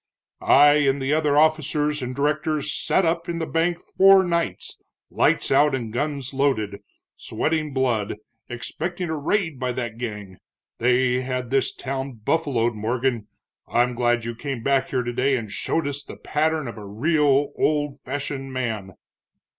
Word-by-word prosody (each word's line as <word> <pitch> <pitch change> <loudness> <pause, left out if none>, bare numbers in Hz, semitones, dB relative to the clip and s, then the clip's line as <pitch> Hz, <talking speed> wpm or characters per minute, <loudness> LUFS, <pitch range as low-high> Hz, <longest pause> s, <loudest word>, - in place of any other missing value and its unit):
"I 145 +1 +6
and 135 +1 +2
the 135 +2 0
other 150 -2 +2
officers 150 -1 +2
and 125 0 -4
directors 150 +1 0
sat 190 - +1
up 170 +1 -1
in 170 - -2
the 165 - -2
bank 165 +2 0
four 195 0 +5
nights, 170 - -2 0.3
lights - - +1
out 145 +1 +4
and 115 -4 -5
guns 140 0 -3
loaded, 120 -8 0 0.4
sweatin' 155 -1 -1
blood, 120 -7 0 0.3
expecting 170 +8 -4
a - - -1
raid 160 -1 -1
by 125 -1 -1
that 120 -2 -5
gang. 105 -6 -6 0.4
They 125 +1 +2
had 125 -2 -4
this 135 -1 +2
town 135 0 -5
buffaloed, 120 0 0
Morgan. 115 +1 -1 0.4
I'm 125 +1 +2
glad 120 -1 +1
you 120 - -3
came 125 -1 -5
back 135 0 +2
here 125 -2 0
today 130 +3 +1
and 110 -4 -6
showed 160 +9 -1
us 145 0 -4
the - - -10
pattern 155 -1 -1
of 115 -2 -7
a 105 - -9
real, 145 +5 +2
old 145 -2 0
fashioned 135 0 -4
man." 110 -7 -3
135 Hz, 155 wpm, -23 LUFS, 120-150 Hz, 0.4 s, I